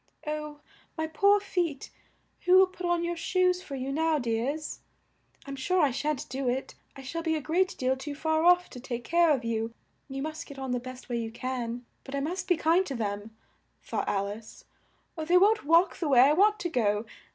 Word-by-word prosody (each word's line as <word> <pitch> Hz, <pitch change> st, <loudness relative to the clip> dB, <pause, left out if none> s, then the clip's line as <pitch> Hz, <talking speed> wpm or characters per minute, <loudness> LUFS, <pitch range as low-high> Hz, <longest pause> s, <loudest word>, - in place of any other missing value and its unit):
"Oh, 300 Hz, -1 st, -5 dB, 0.4 s
my 320 Hz, -, 0 dB
poor 400 Hz, +6 st, +4 dB
feet, 350 Hz, -7 st, -2 dB, 0.5 s
who 365 Hz, +1 st, +7 dB
will 380 Hz, -, +8 dB
put 370 Hz, -1 st, -6 dB
on 345 Hz, -1 st, +1 dB
your 345 Hz, 0 st, -1 dB
shoes 365 Hz, +1 st, +1 dB
for 280 Hz, -, -7 dB
you 265 Hz, +1 st, -3 dB
now, 320 Hz, +2 st, +1 dB
dears? 255 Hz, +5 st, -2 dB, 0.7 s
I'm 275 Hz, -, -6 dB
sure 360 Hz, +8 st, 0 dB
I 290 Hz, -5 st, +4 dB
shan't 295 Hz, +2 st, -2 dB
do 260 Hz, 0 st, -2 dB
it. 260 Hz, +2 st, -3 dB, 0.2 s
I 270 Hz, -, -10 dB
shall 330 Hz, +6 st, -4 dB
be 325 Hz, -1 st, 0 dB
a -, -, -1 dB
great 350 Hz, +5 st, 0 dB
deal 255 Hz, 0 st, +1 dB
too 285 Hz, +2 st, -6 dB
far 315 Hz, +1 st, 0 dB
off 355 Hz, +1 st, +5 dB
to 250 Hz, -, -8 dB
take 240 Hz, -1 st, -5 dB
care 340 Hz, +4 st, +3 dB
of 265 Hz, -6 st, +1 dB
you; 230 Hz, 0 st, -2 dB, 0.3 s
you 270 Hz, 0 st, -4 dB
must 310 Hz, 0 st, -5 dB
get 280 Hz, -, -10 dB
on 265 Hz, -1 st, -4 dB
the 250 Hz, -, 0 dB
best 255 Hz, +1 st, -10 dB
way 240 Hz, -1 st, -2 dB
you 225 Hz, -1 st, -3 dB
can; 245 Hz, 0 st, -4 dB, 0.2 s
but 270 Hz, -, -7 dB
I -, -, 0 dB
must 335 Hz, +7 st, -3 dB
be 355 Hz, -3 st, +3 dB
kind 335 Hz, +4 st, +3 dB
to 275 Hz, -, -4 dB
them," 210 Hz, 0 st, -4 dB, 0.5 s
thought -, -, -2 dB
Al 200 Hz, 0 st, 0 dB
ice, 215 Hz, +2 st, -10 dB, 0.5 s
"or 320 Hz, -, -4 dB
they 350 Hz, +3 st, +5 dB
won't 415 Hz, 0 st, +4 dB
walk 335 Hz, +4 st, +4 dB
the 320 Hz, -, -1 dB
way 250 Hz, -3 st, +7 dB
I 280 Hz, +3 st, +6 dB
want 415 Hz, +5 st, +4 dB
to 345 Hz, -, -1 dB
go! 215 Hz, -6 st, +1 dB
295 Hz, 220 wpm, -28 LUFS, 255-340 Hz, 0.7 s, will